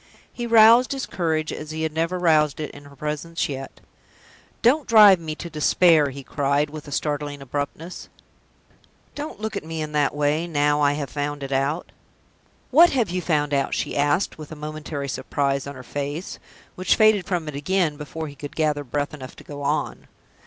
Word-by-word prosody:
He 240 -1 -4
roused 230 +3 +6
his 270 -1 -3
courage 160 -3 -1
as 155 - -7
he 160 +1 -4
had 160 -1 -2
never 165 +3 -1
roused 155 -5 +3
it 155 - -4
in 145 0 -13
her 140 0 -15
presence 150 +4 -3
yet. 135 -1 -7 0.8
"Don't 270 +5 +3
drive 210 -5 +8
me 155 -2 -5
to 170 - -7
despair!" 155 -1 +4
he 140 +1 -8
cried, 140 +1 0
with 155 -1 -9
a - - -9
startling 145 0 -2
abruptness. 145 +6 -5 1.0
"Don't 290 -6 -6
look 220 0 -4
at - - -3
me 160 0 -6
in 155 -1 -4
that 145 -1 +1
way, 150 +3 +1
now 145 -2 +1
I 145 0 +4
have 145 -3 -4
found 145 0 -3
it 135 - -6
out!" 140 +5 -1 0.8
"What 335 +6 +8
have 235 -9 0
you 180 0 -1
found 150 -3 0
out?" 140 -1 +1
she - - -3
asked, 145 +5 +1
with 155 0 -9
a - - -6
momentary 150 -1 -5
surprise 140 0 -1
on 140 - -7
her 130 - -10
face, 145 +7 -5 0.3
which 185 - +1
faded 215 -4 +4
from 175 -5 -2
it 150 - -5
again 165 +1 0
before 155 +2 -6
he 145 - -9
could 145 +1 -9
gather 150 -2 0
breath 145 +3 -3
enough 130 -3 -9
to - - -14
go 145 -1 -8
on. 145 +2 -2
150 Hz, 195 wpm, -23 LUFS, 145-170 Hz, 1.0 s, drive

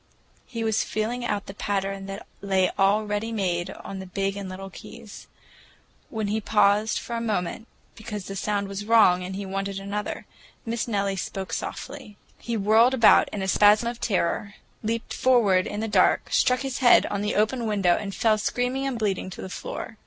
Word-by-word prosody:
He 230 -3 -4
was 220 -1 +1
feeling 230 +3 -2
out 205 -4 -2
the 195 - -8
pattern 195 -1 -3
that 195 0 -7 0.2
lay 190 -2 +1
all 200 +2 +3
ready 210 +2 -2
made 180 -5 -1
on 195 - -8
the 190 - -8
big 195 +2 -2
and 200 -2 -6
little 190 +1 -8
keys. 230 +2 -11 0.8
When 220 -3 -3
he 220 +1 -1
paused 210 +1 +3
for 235 - -5
a 230 - -2
moment, 215 0 -2 0.3
because 210 -3 -7
the 195 - -6
sound 200 0 -1
was 200 +1 -5
wrong 210 -5 +5
and 185 +1 -5
he 200 0 -5
wanted 195 0 -3
another, 200 +1 -4 0.4
Miss 230 +1 -2
Nellie 200 -3 -1
spoke 190 +1 -5
softly. 260 -7 -6 0.2
He 235 -1 -3
whirled 220 +5 +4
about 230 -4 +6
in 200 - -4
a - - -2
spasm 210 +4 +5
of 240 0 -8
terror, 200 -1 -1 0.3
leaped 230 +1 -3
forward 215 -8 +3
in 205 - -4
the 225 - -2
dark, 195 -4 +3
struck 250 0 +3
his 270 -2 -3
head 250 -3 +6
on 200 -1 -2
the 210 +1 -1
open 225 +3 +1
window, 195 -5 +2
and 195 -2 -5
fell 220 -2 +2
screaming 250 +5 -1
and 265 -3 -2
bleeding 200 -4 -1
to 185 - -9
the 190 - -6
floor. - - -6
210 Hz, 190 wpm, -25 LUFS, 195-225 Hz, 0.8 s, about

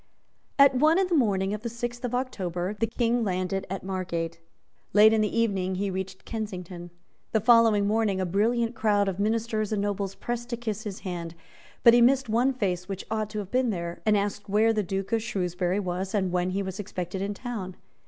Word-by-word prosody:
At 280 -1 +7
one 305 +6 +4
in 385 - +3
the 360 - -2
morning 200 -7 +2
of 210 - -4
the 235 - -3
sixth 240 +1 -5
of 245 0 -1
October, 185 -7 -2
the 225 +2 -1
King 235 +1 0
landed 190 0 -2
at 195 +1 -4
Margate. 170 -3 -3 0.5
Late 215 +2 +7
in 220 - +3
the 215 +2 0
evening 190 -5 0
he 195 +1 -1
reached 190 0 -5
Kensington. 180 -6 -6 0.4
The 220 - +4
following 225 -2 +5
morning 210 -2 +1
a 185 - 0
brilliant 230 +6 +1
crowd 205 -3 +2
of 195 0 -2
ministers 220 0 0
and 215 - 0
nobles 200 -1 -2
pressed 240 0 -4
to 235 - -2
kiss 220 -2 -4
his 200 -2 -6
hand; 170 -3 -5 0.5
but 235 - +8
he 240 - +6
missed 260 +1 +4
one 240 +5 +3
face 185 -7 -2
which 195 -1 -5
ought 215 -1 -1
to 215 - -6
have 200 -2 -5
been 255 -1 +2
there, 170 -4 -4
and 215 -1 +3
asked 205 0 -3
where 220 +3 +3
the 215 - +1
Duke 195 +1 -3
of 225 -1 +2
Shrewsbury 185 -3 -1
was, 185 +1 -3
and 190 -3 +1
when 180 0 0
he 195 +2 -1
was 190 0 -6
expected 185 -1 -4
in 200 +1 -2
town. 200 -6 -5
205 Hz, 210 wpm, -27 LUFS, 190-230 Hz, 0.5 s, but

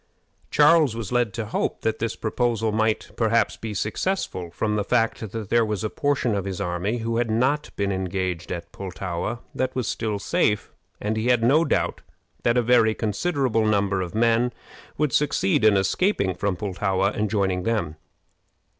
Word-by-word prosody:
Charles 150 -4 +5
was 115 -4 -5
led 120 -3 +2
to 115 -2 -3
hope 110 - -2
that 110 - -1
this 115 0 -2
proposal 115 -1 0
might 110 0 0
perhaps 115 -1 +2
be 110 -2 -6
successful, 105 - -2
from 105 +5 -1
the 105 - 0
fact 115 -2 0
that 110 -3 -5
there 120 -1 +4
was 105 -3 -2
a 110 - -2
portion 140 -6 0
of 100 -2 -1
his 95 -1 -4
army 95 +4 -1
who 115 0 0
had 120 -1 0
not 130 +7 +1
been 100 -1 -1
engaged 95 -2 -2
at 85 -1 -5
Pultowa 95 +4 -4
that 130 0 -2
was 125 -5 -1
still 110 -2 -2
safe; 105 +1 0 0.3
and 110 +1 -2
he 110 +2 -1
had 120 -2 +3
no 145 +7 +5
doubt - - 0 0.4
that 120 +1 +2
a 120 - +3
very 115 -2 +4
considerable 115 - 0
number 100 -2 +1
of 90 +2 -5
men 115 +2 +3 0.5
would 150 -4 0
succeed 125 -9 +2
in 105 -2 +6
escaping 100 - +1
from 100 +2 -1
Pultowa 95 0 0
and 105 -1 0
joining 95 -3 0
them. 90 -7 -1
110 Hz, 175 wpm, -24 LUFS, 100-120 Hz, 0.5 s, in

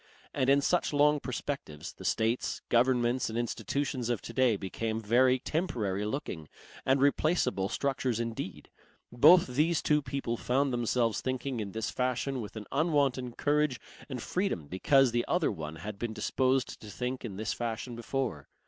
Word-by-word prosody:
And 130 - +1
in 140 +1 +5
such 175 +1 +1
long 150 +1 +4
perspectives, 125 - -5
the - - -11
states, 115 +2 0
governments 120 0 +2
and 110 - -4
institutions 120 +2 -2
of 120 -4 0
to - - -7
day 130 -4 +3
became 110 +3 -3
very 125 +4 +4
temporary 120 - -2
looking 105 - -5 0.4
and 135 +1 +4
replaceable 140 - +2
structures 130 -4 -1
indeed. 115 -5 -5 0.4
Both 155 +9 +7
these 150 +6 +1
two 150 0 +3
people 130 -3 -3
found 135 +3 +1
themselves 120 -1 +1
thinking 130 -1 -2
in 100 -3 -4
this 110 0 -2
fashion 130 +1 -1
with 105 - -8
an 110 -1 -6
unwonted 140 -6 +1
courage 150 -3 +1 0.3
and 130 -2 -4
freedom 180 - -2
because 130 - +3
the 120 0 +1
other 175 -3 +2
one 80 -5 -6
had 100 +5 -7
been 120 -1 -3
disposed 130 +2 0
to 105 - -9
think 125 +4 -4
in 100 -6 -6
this 110 +1 -2
fashion 120 +1 -4
before. 120 - -3
125 Hz, 160 wpm, -30 LUFS, 110-140 Hz, 0.4 s, Both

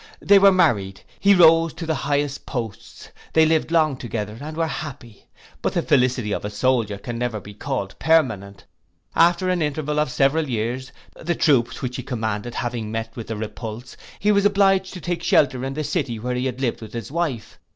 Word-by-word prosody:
They 200 0 +6
were 195 0 +7
married; 110 - +1 0.2
he 200 0 +5
rose 165 -2 +6
to 165 0 -6
the 160 - 0
highest 145 -1 -2
posts; 115 -6 -6 0.2
they 160 0 +5
lived 160 0 +1
long 155 -4 +2
together, 110 -4 -5
and 155 +2 -7
were 165 - +1
happy. 135 -8 -7 0.3
But - - -1
the - - 0
felicity 125 -5 +2
of - - -2
a 105 - -3
soldier 105 -1 0
can 115 +3 -6
never 120 -3 -2
be 105 +1 -11
called 105 -3 -4
permanent: 110 -12 +1 0.5
after 175 +2 +4
an 180 -2 +1
interval 150 0 -1
of 150 - +1
several 140 +3 +1
years, 120 +3 -3 0.2
the 170 +1 -2
troops 120 -7 +2
which 125 -1 -3
he - - -4
commanded 110 -1 -3
having 120 -3 -3
met 115 0 -4
with 115 -2 -7
a 110 - -2
repulse, 110 +2 -7 0.2
he 210 - +2
was 200 -1 +3
obliged 195 -2 +3
to 180 - -7
take 175 0 -3
shelter 130 -6 +2
in 135 0 -4
the 155 - -2
city 140 -7 -2
where 125 +3 -3
he 125 +1 -1
had 130 0 -5
lived 120 -4 -1
with 110 -1 -10
his 115 0 -6
wife. 150 -9 -3
130 Hz, 200 wpm, -22 LUFS, 115-160 Hz, 0.5 s, were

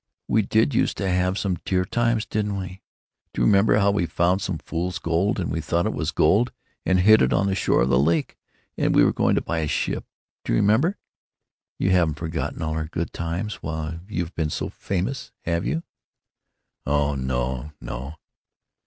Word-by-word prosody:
We 110 - +3
did 110 +6 +2
use - - +1
to 100 - -2
have 90 +1 +1
some 95 -5 -1
dear 90 -1 +1
times, 115 +2 +1
didn't 105 -1 -2
we! 95 0 -7 0.5
Do - - -1
you - - +4
remember 100 - +5
how 100 -1 +4
we 100 -4 0
found 90 +4 +1
some 90 -2 -2
fool's 90 +3 -3
gold, 85 +4 0
and 85 - -2
we 80 - -1
thought 85 +3 0
it - - 0
was - - -2
gold 105 +10 +3 0.4
and 95 -1 +4
hid 110 +3 +7
it 65 - +3
on 95 - +2
the 100 - +1
shore 95 - +2
of 65 - 0
the 65 -1 +4
lake, 80 +2 +1 0.4
and - - +2
we - - +6
were - - +3
going - - +2
to - - +1
buy 85 - -2
a 80 - -1
ship? - - -1 0.4
Do - - -1
you - - +3
remember? 125 - +3 0.8
You 95 - +1
haven't 85 -5 +3
forgotten 80 +1 -3
all 80 0 -1
our 80 0 -2
good 85 +1 -4
times, 85 +6 -4
while 80 +1 -4
you've 90 -4 -3
been 80 -2 -1
so - - -3
famous, 100 +8 -3
have 85 +1 -1
you?" 165 +1 -1 1.0
"Oh 75 0 +1
no, 65 +1 -2
no!" 65 +5 -6
85 Hz, 195 wpm, -24 LUFS, 80-100 Hz, 1.0 s, hid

